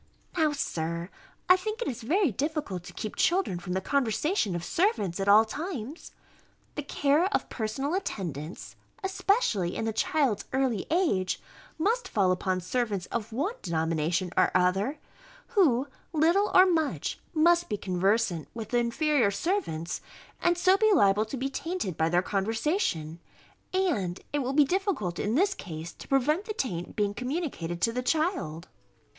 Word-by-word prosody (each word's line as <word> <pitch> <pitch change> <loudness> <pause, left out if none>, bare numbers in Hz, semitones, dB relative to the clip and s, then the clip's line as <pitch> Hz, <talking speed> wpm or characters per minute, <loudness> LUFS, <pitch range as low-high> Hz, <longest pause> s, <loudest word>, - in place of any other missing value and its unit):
Now, 315 -3 +3
Sir, 170 - -3 0.4
I 365 - +8
think 430 +5 -4
it 480 - -2
is 245 -2 -4
very 325 - +2
difficult 290 - -2
to - - -10
keep 215 - -5
children 345 - +1
from 180 +1 -5
the 190 - 0
conversation 265 - 0
of 170 - -3
servants 265 - 0
at 195 - -1
all 210 +2 +7
times. 295 - -6 0.6
The 295 - -3
care 290 +3 +2
of - - -1
personal 265 +7 -2
attendance, 175 - -4 0.3
especially 380 - +1
in 225 - -2
the 225 - -1
child's 270 -2 +1
early 260 -6 0
age, 295 - +1 0.4
must 445 +9 +1
fall 190 -3 +2
upon 185 0 0
servants 205 -2 -1
of 230 -1 -3
one 290 - -1
denomination 165 +1 0
or - - +4
other, 190 +10 +2 0.5
who, 290 - +3 0.3
little 340 +7 +3
or 370 - +8
much, 320 -5 0 0.2
must 340 +2 +4
be 210 - -1
conversant 190 -1 0
with 225 -2 -6
the 240 - +2
inferior 245 0 +2
servants, 200 - -2 0.4
and 345 0 +3
so 370 +2 +4
be 435 +1 +4
liable 210 - +4
to 245 +5 -5
be 260 +2 -1
tainted 325 - -3
by 160 +1 +1
their 175 +2 +2
conversation; 200 - -1 0.5
and 265 - 0
it 290 - +1
will 260 -1 -1
be 290 0 +5
difficult 355 - -1
in 215 +3 0
this 390 +6 +3
case 165 - -7
to - - -12
prevent 300 +8 +2
the 430 - -4
taint 175 - -3
being 205 -1 0
communicated 250 - -3
to 230 - +3
the 250 - -1
child. 250 - -1
240 Hz, 160 wpm, -28 LUFS, -, 0.6 s, I